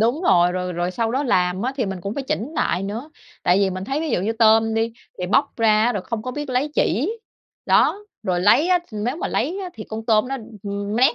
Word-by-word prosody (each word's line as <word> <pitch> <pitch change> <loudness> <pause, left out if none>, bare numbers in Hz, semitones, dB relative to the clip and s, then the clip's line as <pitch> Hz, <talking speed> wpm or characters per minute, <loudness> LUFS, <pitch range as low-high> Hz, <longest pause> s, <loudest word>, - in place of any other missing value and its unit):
đúng 240 +9 +1
rồi, 175 - +4
rồi 180 0 -3
rồi 175 +1 -1
sau 225 +3 -1
đó 270 - +1
làm 180 -4 +1
á, 255 - -1
thì 245 -6 0
mình 190 -2 -4
cũng 200 +4 -4
phải 280 - -3
chỉnh 265 +2 -3
lại 195 - 0
nữa. 225 +10 -5 0.3
Tại 180 +2 +4
vì 195 -1 +2
mình 185 +1 -5
thấy, 275 +6 -2
ví 320 -2 -2
dụ - - +1
như, 210 +5 0
tôm 225 0 +4
đi 225 +1 0 0.3
thì 180 - -2
bóc 275 +9 +2
ra 225 +1 +3
rồi 200 -4 -3
không 230 -2 -4
biết 295 -2 -4
lấy 255 +4 +1
chỉ, 315 - +1 0.5
đó. 415 +1 +3 0.2
Rồi 180 -1 0
lấy 275 - +4
á 360 -1 +4
nếu 220 +6 -2
mà - - -3
lấy 335 - -1
á, 365 - -4
thì 215 - -8
con 220 0 -5
tôm 220 +2 +3
nó, 270 - -2 0.3
ừm, 200 +1 -3
nát 260 +5 +4
225 Hz, 250 wpm, -22 LUFS, 195-270 Hz, 0.5 s, rồi